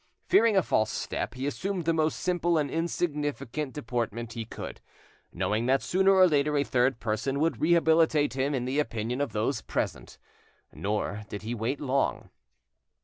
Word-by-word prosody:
Fearing 230 - +4
a 190 - +4
false 110 -6 +1
step, - - -3
he 130 +1 -4
assumed 180 +4 -2
the 165 - +2
most 155 -1 0
simple 175 -2 +1
and 145 -3 0
insignificant 150 -4 -2
deportment 120 -3 -3
he 115 -1 -5
could, - - -8 0.5
knowing 110 +3 -1
that 135 +1 +2
sooner 190 +1 +3
or 190 -1 +7
later 150 -2 +2
a 140 - +3
third 125 -2 +1
person 120 +5 -1
would 165 +2 0
rehabilitate 160 -3 +3
him 135 +2 0
in 125 -2 -2
the 135 +3 0
opinion 120 -1 -2
of 145 - -1
those 105 0 -1
present. - - -4 0.6
Nor 105 +1 -2
did 105 - -6
he 115 +2 -3
wait 120 +5 -2
long. 135 -1 -1
140 Hz, 165 wpm, -28 LUFS, 120-160 Hz, 0.6 s, or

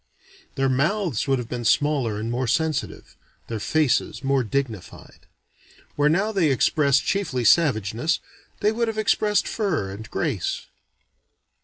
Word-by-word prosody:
Their 135 -1 +1
mouths 155 - 0
would 135 -1 +2
have 125 -2 -5
been 120 0 -5
smaller 130 -4 +1
and 115 +2 -3
more 125 +1 -1
sensitive: 155 +4 -2 0.3
their 115 -2 -3
faces 145 +4 0
most 135 -4 +1
dignified. 120 -8 -5 0.7
Where 145 0 +3
now 195 +7 +1
they 185 -7 +2
express 140 +1 +3
chiefly 135 -12 -1
savageness, 125 - +2 0.4
they 210 - +3
would 230 +1 -1
have 225 -1 -3
expressed 210 -1 +1
fire 175 - -1
and 110 +3 -9
grace. - - -2
140 Hz, 135 wpm, -23 LUFS, 120-170 Hz, 0.7 s, Where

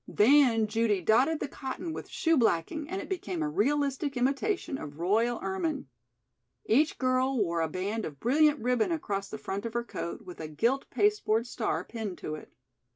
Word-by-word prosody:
Then 230 0 +5
Judy 215 -1 +1
dotted 255 - +3
the - - -2
cotton 285 +6 -5
with - - -7
shoe 330 -2 +2
blacking 255 - +1
and 380 +2 -3
it - - -6
became 195 - -3
a - - 0
realistic 275 - 0
imitation 275 - 0
of 145 0 -8
royal 220 +8 +1
ermine. 330 - -2 0.8
Each 290 +8 +3
girl 255 +1 +1
wore 170 -6 +1
a 160 - 0
band 200 +6 -2
of 145 -3 -8
brilliant 295 +5 +4
ribbon 245 +4 +1
across 200 -11 -2
the 220 - -5
front 200 -1 -4
of 230 0 -5
her 235 - 0
coat 170 -7 -6
with 180 -1 -10
a 160 - -5
gilt 235 - 0
pasteboard 240 - +2
star 215 -9 -2
pinned 220 -5 -5
to 155 - -5
it. 155 - -9
235 Hz, 180 wpm, -29 LUFS, 200-285 Hz, 0.8 s, Then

